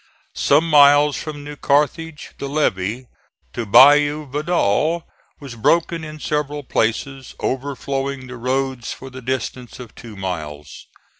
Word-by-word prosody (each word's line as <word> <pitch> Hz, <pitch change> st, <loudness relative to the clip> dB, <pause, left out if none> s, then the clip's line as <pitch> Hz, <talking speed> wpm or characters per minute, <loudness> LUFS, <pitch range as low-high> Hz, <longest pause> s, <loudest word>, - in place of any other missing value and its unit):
Some 150 Hz, +4 st, +2 dB
miles 145 Hz, -1 st, +6 dB
from 150 Hz, -2 st, -6 dB
New 145 Hz, 0 st, -8 dB
Carthage 150 Hz, +3 st, -1 dB
the 140 Hz, -, -4 dB
levee 120 Hz, -5 st, -1 dB, 0.5 s
to 120 Hz, -2 st, -4 dB
Bayou 145 Hz, +6 st, +6 dB
Vidal 155 Hz, -, 0 dB, 0.3 s
was 140 Hz, -4 st, -9 dB
broken 165 Hz, +8 st, +1 dB
in 155 Hz, 0 st, -8 dB
several 150 Hz, -1 st, -2 dB
places, 130 Hz, +2 st, -2 dB
overflowing 135 Hz, 0 st, -3 dB
the 125 Hz, 0 st, -9 dB
roads 130 Hz, 0 st, -2 dB
for 135 Hz, 0 st, -9 dB
the 130 Hz, +1 st, -9 dB
distance 125 Hz, -1 st, -4 dB
of 120 Hz, -3 st, -10 dB
two 115 Hz, -3 st, -11 dB
miles. 80 Hz, -6 st, -6 dB
140 Hz, 130 wpm, -20 LUFS, 125-150 Hz, 0.5 s, miles